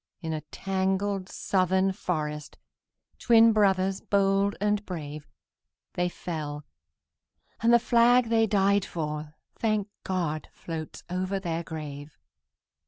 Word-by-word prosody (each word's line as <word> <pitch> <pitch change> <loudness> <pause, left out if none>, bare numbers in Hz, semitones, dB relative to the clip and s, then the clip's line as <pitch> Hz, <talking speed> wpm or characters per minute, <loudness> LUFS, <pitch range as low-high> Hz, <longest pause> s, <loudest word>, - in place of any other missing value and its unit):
In 160 -2 -4
a 155 - -3
tangled 195 0 -1
Southern 190 0 +1
forest, 150 -6 -4 0.6
Twin 230 -1 +6
brothers 195 -2 +2
bold 200 0 +2
and 210 0 +1
brave, 150 -6 -7 0.7
They 180 0 0
fell; 150 -4 -5 1.0
and 230 +1 +4
the 235 - +8
flag 235 +1 +4
they 225 -1 +3
died 200 -1 +3
for, 150 -2 -5 0.2
Thank 215 -2 0
God! 170 -5 -2
floats 160 -2 -7
over 185 +2 -2
their 170 -3 -2
grave. 150 -2 -8
190 Hz, 110 wpm, -27 LUFS, 160-205 Hz, 1.0 s, the